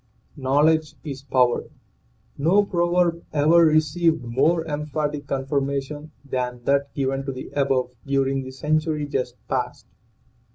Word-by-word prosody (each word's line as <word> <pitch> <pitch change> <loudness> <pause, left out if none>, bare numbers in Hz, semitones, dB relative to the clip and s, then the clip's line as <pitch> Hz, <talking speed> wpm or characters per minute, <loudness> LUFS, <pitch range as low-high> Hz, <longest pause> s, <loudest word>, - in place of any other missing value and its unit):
"KNOWLEDGE 150 +3 +2
IS 140 -3 -6
POWER' 125 -3 +1 0.7
1 185 +8 +3
proverb 175 -2 +1
ever 155 +3 +5
received 160 +1 +2
more 145 +8 +1
emphatic 150 -1 -3
confirma 140 +1 -1
tion 150 +2 -9 0.2
than 125 -2 -3
that 140 +2 +1
given 135 0 -1
to 135 - -3
the 130 0 -8
above 135 -3 +1 0.2
during 135 0 +1
the 130 - -7
century 155 +2 0
just 125 -3 -2
past. - - -3
145 Hz, 125 wpm, -23 LUFS, 135-155 Hz, 0.7 s, ever